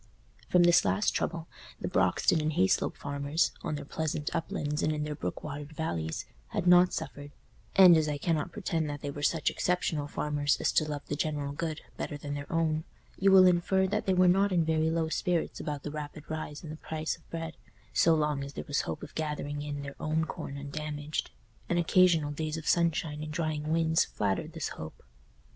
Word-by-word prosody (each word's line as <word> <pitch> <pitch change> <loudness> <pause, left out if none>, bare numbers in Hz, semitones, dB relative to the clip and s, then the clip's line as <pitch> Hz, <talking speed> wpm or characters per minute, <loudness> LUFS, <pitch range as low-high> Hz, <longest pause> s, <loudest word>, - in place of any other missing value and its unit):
From 180 -1 +5
this 175 0 +6
last 210 - +2
trouble 165 -1 -2 0.3
the - - -3
Broxton 160 - +2
and 155 +1 0
Hayslope 95 -8 +2
farmers, 140 +3 0
on 160 -3 -2
their 145 -1 -6
pleasant 155 0 -3
uplands 150 -2 -2
and 155 - +2
in 150 -1 -1
their 150 0 -3
brook 90 -11 -5
watered 145 0 -6
valleys, 85 - -3 0.2
had - - -3
not 180 0 +7
suffered, 145 0 -5 0.5
and 185 -3 +9
as 155 -1 +2
I 145 - -1
cannot 160 +2 -1
pretend 170 -5 -2
that 145 0 -5
they 145 - -3
were 145 - -7
such 150 +2 +2
exceptional 165 -5 0
farmers 145 -1 0
as - - +1
to 155 - +2
love 145 -1 -4
the 145 - -3
general 145 -1 -2
good 155 +1 -3 0.2
better 150 - -4
than 145 0 -5
their 145 0 -6
own, 160 -1 +1 0.4
you 195 0 +5
will 190 -1 +9
infer 180 +2 +3
that 210 +2 -1
they 190 - +4
were 180 0 +5
not 195 +3 +4
in 170 -3 +2
very 160 0 +2
low 165 0 0
spirits 170 +1 -1
about 145 -3 -4
the 150 - -4
rapid 150 0 -6
rise 155 -1 -5
in 155 - -7
the 155 - -7
price 160 0 -3
of 165 - -24
bread, 165 -1 -5 0.4
so 165 -1 +5
long 150 -2 0
as 140 0 -7
there - - -6
was 145 - +1
hope - - -5
of 150 - -9
gathering 150 -2 -3
in 145 -1 -4
their 140 0 -7
own 155 +1 0
corn 140 -2 -6
undamaged; 150 +1 -4 0.4
and 175 - +1
occasional 170 -3 +4
days 155 +1 -3
of 160 - -7
sunshine 165 -3 +1
and 155 0 -5
drying 155 -2 -2
winds 160 0 +3
flattered 100 -2 -2
this - - -3
hope. 80 0 -9
155 Hz, 205 wpm, -30 LUFS, 145-165 Hz, 0.5 s, and